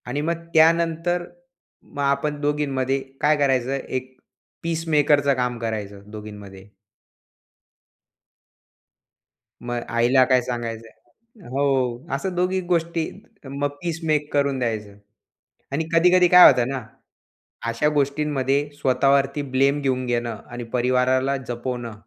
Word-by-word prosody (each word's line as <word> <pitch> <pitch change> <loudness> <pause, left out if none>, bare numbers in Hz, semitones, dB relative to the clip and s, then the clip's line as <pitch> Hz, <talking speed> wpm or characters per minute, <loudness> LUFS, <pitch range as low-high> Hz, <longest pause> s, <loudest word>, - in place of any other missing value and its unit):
आणि 140 +4 -2
मग 170 +2 -2
त्यानंतर 165 +2 +3 0.6
मग 140 - -7
आपण 140 +1 0
दोघींमध्ये 135 -3 0 0.2
काय 150 +1 +4
करायचं, 135 -3 +1
एक 130 -1 -5 0.5
पीसमेकरचं 150 -4 +2
काम 125 -1 -2
करायचं 105 -3 -5
दोघींमध्ये. 105 -2 -10 2.9
मग 120 0 -3
आईला 120 +3 +4
काय 130 -1 +3
सांगायचं 120 - -8
हो, 130 -1 0
असं 180 +6 -3
दोघी 180 +1 0
गोष्टी 165 -1 0 0.4
मग 140 +1 -2
पीस 170 -2 -3
मेक 150 -1 0
करून 140 -2 +1
द्यायचं 110 -4 -3 0.8
आणि 160 +3 -1
कधी-कधी 180 +2 +5
काय 180 +1 +9
होतं 125 -1 0
ना, 135 -2 -4 0.9
अशा 115 +6 +1
गोष्टींमध्ये 140 -1 0
स्वतःवरती 135 +2 +2
ब्लेम 135 +2 +2
घेऊन 130 -2 -1
घेणं 120 -2 -2
आणि 120 0 -6
परिवाराला 130 +2 +1
जपवणं 120 -1 -4
135 Hz, 110 wpm, -23 LUFS, 125-150 Hz, 2.9 s, काय